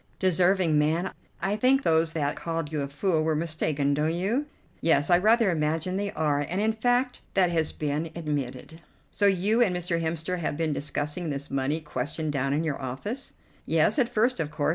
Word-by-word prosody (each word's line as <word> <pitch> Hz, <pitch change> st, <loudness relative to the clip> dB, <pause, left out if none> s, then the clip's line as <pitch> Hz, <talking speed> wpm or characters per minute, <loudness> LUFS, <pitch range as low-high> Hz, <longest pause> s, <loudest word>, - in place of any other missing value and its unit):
"Deserving 180 Hz, -3 st, +3 dB
man! 160 Hz, +5 st, 0 dB, 0.3 s
I 195 Hz, +2 st, +1 dB
think 260 Hz, +5 st, +3 dB
those 160 Hz, 0 st, +3 dB
that 145 Hz, -3 st, -1 dB
called 165 Hz, -2 st, -3 dB
you 150 Hz, -2 st, -1 dB
a 140 Hz, -, -2 dB
fool 155 Hz, +3 st, 0 dB
were 160 Hz, 0 st, +1 dB
mistaken, 155 Hz, -3 st, 0 dB
don't 155 Hz, +3 st, 0 dB
you?" 225 Hz, +12 st, -1 dB, 0.3 s
"Yes, 145 Hz, -1 st, +3 dB
I 175 Hz, -, +6 dB
rather 220 Hz, +1 st, +4 dB
imagine 160 Hz, +3 st, -1 dB
they 200 Hz, +1 st, -2 dB
are, 150 Hz, -2 st, +1 dB
and 180 Hz, +3 st, -1 dB
in 220 Hz, +1 st, +2 dB
fact 245 Hz, +3 st, 0 dB
that 185 Hz, -3 st, +3 dB
has 160 Hz, -2 st, +1 dB
been 150 Hz, +2 st, -2 dB
admitted." 145 Hz, -1 st, -4 dB, 0.3 s
"So 205 Hz, -, +2 dB
you 200 Hz, +5 st, +2 dB
and 195 Hz, -7 st, +3 dB
Mr. 175 Hz, -1 st, -1 dB
Hemster 165 Hz, +2 st, -2 dB
have 155 Hz, -3 st, -2 dB
been 160 Hz, -2 st, 0 dB
discussing 150 Hz, +4 st, -3 dB
this 140 Hz, 0 st, -4 dB
money 135 Hz, +4 st, 0 dB
question 150 Hz, +2 st, -3 dB
down 135 Hz, -1 st, -1 dB
in 150 Hz, +3 st, +1 dB
your 150 Hz, -4 st, -2 dB
office?" 205 Hz, -, -4 dB, 0.3 s
"Yes, -, -, +3 dB
at 240 Hz, -3 st, +2 dB
first, 240 Hz, +1 st, +1 dB
of 155 Hz, -2 st, -1 dB
course. 145 Hz, -1 st, -1 dB
165 Hz, 190 wpm, -27 LUFS, 150-190 Hz, 0.3 s, I